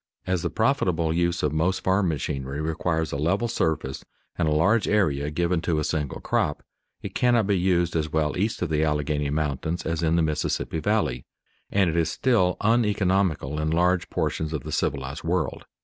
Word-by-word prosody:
As 95 -2 0
the - - -1
profitable 90 - +1
use 85 0 0
of 75 -1 +1
most 85 +5 0
farm 95 0 +2
machinery 70 -2 -3
requires 80 +1 -1
a - - -2
level 90 +10 +1
surface 80 - -1 0.3
and 80 - 0
a - - +2
large 100 +9 +3
area 75 -9 +1
given 85 +2 0
to 85 -2 0
a 75 - 0
single 75 -3 -2
crop, - - -1 0.4
it - - -6
cannot 120 -3 +3
be 100 0 +2
used 90 -2 +1
as 80 -1 -1
well 75 -1 0
east 105 +1 -1
of 90 - -2
the 75 0 +1
Alleghany 75 -1 0
Mountains 75 +3 -2
as 80 0 -1
in 80 0 +2
the 85 - +3
Mississippi 75 +1 -1
Valley, 80 - 0 0.5
and 100 -2 +2
it 80 - -1
is 85 -1 +2
still 95 -3 +2
uneconomical 95 - +1
in 75 0 0
large 90 +2 +2
portions 80 0 -2
of 75 - -3
the - - -6
civilized 70 +2 -2
world. 90 +3 -1
80 Hz, 185 wpm, -25 LUFS, 75-95 Hz, 0.5 s, large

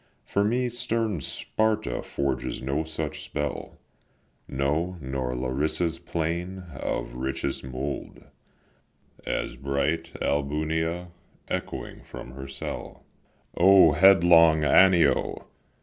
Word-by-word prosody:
For 100 - +1
me 125 +4 +1
stern 115 -6 -1
Sparta 110 - -1
forges 70 -2 -2
no 70 +4 -1
such 80 -1 -4
spell, 75 -1 -4 0.7
No, 75 +7 -1
nor 65 -2 -3
Larissa's 75 +6 -1
plain 85 +3 -3
of 65 - -3
richest 65 +2 -3
mould, 65 +2 -5 1.0
As - - -2
bright 70 +4 -1
Albunea 80 +4 -1 0.4
echoing - - -4
from 65 - -10
her 65 +1 -8
cell. 70 - -7 0.5
O 95 0 +7
headlong 85 -2 +6
Anio! 90 +2 +4
80 Hz, 95 wpm, -26 LUFS, 70-90 Hz, 1.0 s, O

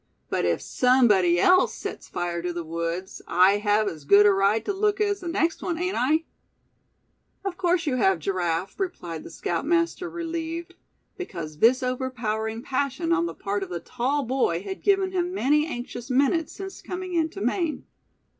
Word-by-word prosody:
But - - 0
if 85 -1 0
somebody 210 -9 +4
else 370 - +4
sets - - -7
fire 175 -1 -3
to 175 +1 -2
the 170 0 -4
woods, 170 +4 -4
I 185 +3 +5
have 210 0 +2
as 155 -5 -5
good 200 +8 +6
a 205 - +7
right 200 +3 +2
to 405 - -1
look 415 +1 +1
as 410 -1 +1
the 360 - -7
next 335 -1 0
one, 340 -2 -2
ain't 360 +2 -1
I?" 300 +6 +2 1.2
"Of 390 -3 -2
course 350 -1 +1
you 265 -4 0
have, 190 -6 +3
Giraffe," 175 - -2
replied 175 - -4
the - - -9
scoutmaster, 335 - -1
relieved, 335 0 -4 0.5
because 165 - -6
this 250 +5 +4
overpowering 230 -3 -2
passion 280 +6 -1
on 340 0 +1
the - - -6
part 200 0 -2
of 195 - -5
the 175 -1 -4
tall 260 - -1
boy 235 -9 0
had 195 -1 -6
given 390 -2 +2
him 360 0 -1
many 300 -1 +2
anxious 245 -3 -6
minutes 280 +5 +2
since 385 0 -8
coming 365 0 -5
into 325 +2 0
Maine. 340 -6 -1
255 Hz, 175 wpm, -25 LUFS, -, 1.2 s, a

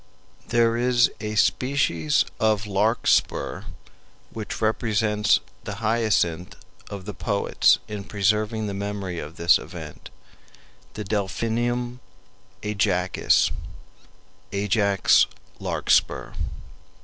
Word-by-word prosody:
There 115 -1 +2
is 120 0 +3
a 105 0 -4
species 105 - +2
of 110 -1 +2
Larkspur 105 +3 +1 0.7
which 110 -2 -6
represents 110 -1 +2 0.2
the 105 - -5
hyacinth 105 -6 0 0.3
of 100 -2 -7
the 105 - -5
poets 100 +1 +2
in 105 -2 -6
preserving 105 +2 0
the 100 - -3
memory 100 -3 -4
of 75 +3 -8
this 85 -1 +4
event, - - -9 0.9
the 105 - -4
Delphinium 115 +4 -2 0.6
Ajacis 100 -3 +2 1.0
Ajax's 100 -1 +3 0.3
Larkspur. - - +1
105 Hz, 90 wpm, -24 LUFS, 100-115 Hz, 1.0 s, this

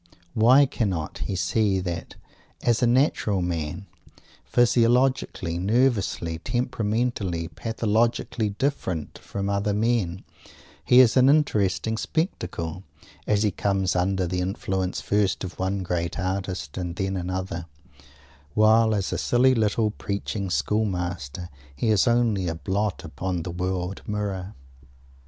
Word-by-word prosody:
Why 125 +6 +6
cannot 100 - -2
he 100 - -2
see 95 +2 +1
that, 85 -2 -5 0.5
as 120 0 +2
a 120 - +4
natural 120 - +2
man, 85 +1 -3 0.6
physiologically, 120 -7 +2
nervously, 100 -6 +1
temperamentally, 110 -6 -1
pathologically 115 +3 0
different 100 - -3
from 100 0 -4
other 100 0 0
men, 105 -5 0 0.6
he 125 +1 +7
is 120 -4 +4
an 130 +1 +6
interesting 110 -7 +2
spectacle, 95 - -3 0.5
as 105 0 +2
he 105 - +2
comes 95 -1 0
under 95 +1 +1
the 90 +1 -2
influence 95 0 -2
first 100 -2 +1
of 90 -2 -7
one 95 +1 -1
great 85 -1 -2
artist 95 -5 -3
and 90 -2 -4
then 95 +1 -2
another, 90 -1 -4 0.9
while 110 +1 +5
as 100 -2 -1
a - - -1
silly, 130 +2 +4
little, 110 -1 +1
preaching 100 -1 -4
school 90 +8 +1
master, 90 -4 -4 0.3
he 110 - -1
is 110 +2 +3
only 115 -6 +2
a 85 - -2
blot 100 +5 -2
upon 90 +2 -3
the 85 - -5
world 90 +1 -3
mirror! 100 -2 -3
100 Hz, 125 wpm, -25 LUFS, 90-115 Hz, 0.9 s, he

